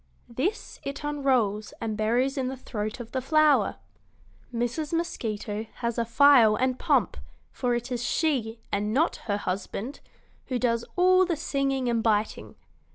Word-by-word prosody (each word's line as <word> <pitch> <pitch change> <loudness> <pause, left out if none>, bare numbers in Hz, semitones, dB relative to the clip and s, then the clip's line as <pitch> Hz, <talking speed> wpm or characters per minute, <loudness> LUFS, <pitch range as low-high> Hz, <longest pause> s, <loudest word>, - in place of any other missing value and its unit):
This 305 - -3
it 280 +1 -6
unrolls 255 -8 0
and 220 -1 -3
buries 240 +6 +1
in 265 -2 -1
the 265 +1 -4
throat 215 -2 -5
of 235 -1 -8
the 260 - -2
flower. 305 +2 +3 0.8
Mrs. 240 +6 -2
Mosquito 220 -10 -3
has 235 -1 -2
a 230 - +1
file 235 -2 +6
and 255 +2 0
pump, 260 - +2 0.3
for 245 -1 0
it 240 +2 -4
is 245 -1 -2
she, 245 -7 0
and 210 +2 -1
not 320 +5 +2
her 205 -1 +1
husband, 200 +6 -4 0.5
who 255 - -1
does 235 -1 +1
all 370 +1 +5
the 350 -2 0
singing 275 -3 -1
and 235 -1 +1
biting. 215 -1 0
245 Hz, 155 wpm, -27 LUFS, 220-280 Hz, 0.8 s, file